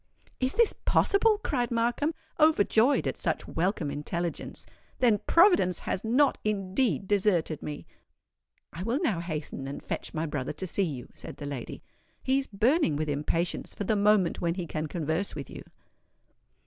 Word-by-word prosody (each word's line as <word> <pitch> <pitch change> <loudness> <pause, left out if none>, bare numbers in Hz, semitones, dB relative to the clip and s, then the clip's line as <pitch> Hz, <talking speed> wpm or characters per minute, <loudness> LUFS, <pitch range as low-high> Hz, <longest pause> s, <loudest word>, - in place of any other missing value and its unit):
"Is 260 +1 0
this 465 -2 +5
possible?" 420 +2 +2
cried 250 - 0
Markham, 240 +7 0 0.2
overjoyed 285 -4 +4
at - - -3
such - - -2
welcome 165 -3 -1
intelligence. 170 +4 -4 0.3
"Then 230 -5 +3
Providence 335 - +4
has 190 - -3
not 255 +5 +3
indeed 200 +1 0
deserted 185 -6 +1
me!" 150 -1 -6 0.9
"I 165 - -7
will 230 +7 0
now 210 - +1
hasten 155 -5 -5
and 140 - -7
fetch - - -4
my 160 +1 -2
brother 145 -4 -3
to 190 - -5
see 190 - -2
you," 140 -10 -3
said - - -9
the 145 - -7
lady. 140 -4 -6 0.4
"He 265 +1 +2
is 275 - -4
burning 225 - +2
with 155 +1 -2
impatience 150 +4 -2
for - - -3
the 215 +2 +1
moment 205 -3 +3
when 170 -1 0
he 180 -2 -3
can 155 -1 -3
converse 160 +4 -2
with - - -7
you." - - -8
195 Hz, 160 wpm, -28 LUFS, 160-245 Hz, 0.9 s, this